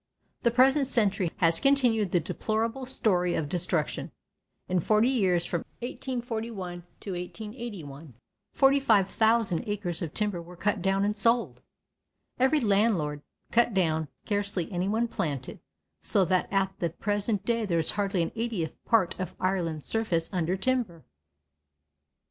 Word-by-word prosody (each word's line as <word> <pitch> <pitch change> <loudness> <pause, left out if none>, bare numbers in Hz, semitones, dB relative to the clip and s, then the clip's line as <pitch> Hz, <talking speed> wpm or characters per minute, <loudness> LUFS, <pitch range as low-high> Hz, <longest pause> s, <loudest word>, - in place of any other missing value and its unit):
The 235 - +3
present 265 +3 +4
century 205 -8 +1
has 165 -1 +3
continued 245 -8 +3
the 175 - +3
deplorable 225 +9 -2
story 180 -9 +1
of 150 - -1
destruction. 175 -1 -1 0.6
In 180 0 +1
forty 215 +7 +3
years, 185 -9 +2
from 170 - -1 0.2
1841 230 -7 -4 0.2
to 200 - -5
1881, 180 - -7 0.4
45,000 225 - +3
acres 205 -4 -2
of 165 -4 -3
timber 205 -5 -1
were 175 +1 -12
cut 205 +2 -1
down 195 +2 +2
and 210 +1 0
sold. 230 +3 +1 0.8
Every 265 +4 +4
landlord 200 - +1 0.3
cut 235 -2 +3
down, 160 -4 +1 0.2
scarcely 200 -4 -1
anyone 200 +6 0
planted, 145 - -4 0.4
so 195 -2 +3
that 185 0 0
at 195 -1 +1
the 170 - 0
present 205 +4 -1
day 230 -2 0
there 170 -3 +1
is 160 - +3
hardly 195 -4 0
an - - -3
eightieth 220 -9 -3
part 220 -7 +3
of 185 - -4
Ireland's 175 -5 -1
surface 185 -8 -1
under 180 +1 0
timber. 215 -7 -1
200 Hz, 135 wpm, -28 LUFS, 175-230 Hz, 0.8 s, present